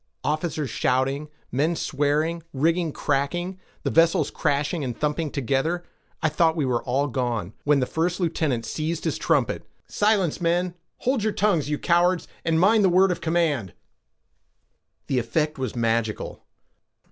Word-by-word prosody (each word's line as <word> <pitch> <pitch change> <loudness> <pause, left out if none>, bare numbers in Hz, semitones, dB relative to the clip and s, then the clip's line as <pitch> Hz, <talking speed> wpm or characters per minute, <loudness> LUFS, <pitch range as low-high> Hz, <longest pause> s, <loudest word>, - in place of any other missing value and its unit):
Officers 155 -3 -1
shouting, 135 +6 0 0.2
men 155 +6 +1
swearing, 150 +4 0
rigging 165 +4 +1
cracking, 175 +7 -1 0.2
the - - 0
vessels 165 -3 +3
crashing 145 +3 0
and 125 -3 -4
thumping 150 +1 0
together, 140 +6 -1 0.4
I - - +5
thought 160 +1 +2
we 155 -4 0
were 125 -2 0 0.3
gone, 120 -6 -2
when 145 -2 +4
the - - +2
first 170 +6 -1
lieutenant 155 -9 0
seized 160 +1 -3
his - - -1
trumpet—"Silence, 205 -6 0
men; 175 +1 +1 0.3
hold 255 -2 +1
your 215 -1 +1
tongues, 175 -8 +1
you 150 - 0
cowards, 175 +2 +2 0.2
and 160 -1 +2
mind 205 +4 +5
the 190 - +5
word 185 +2 +4
of 175 - -3
command!" 160 - 0 1.3
The 130 - +1
effect 150 +6 -1
was 130 -1 -3
magical. 115 -2 -1
155 Hz, 140 wpm, -24 LUFS, 135-175 Hz, 1.3 s, I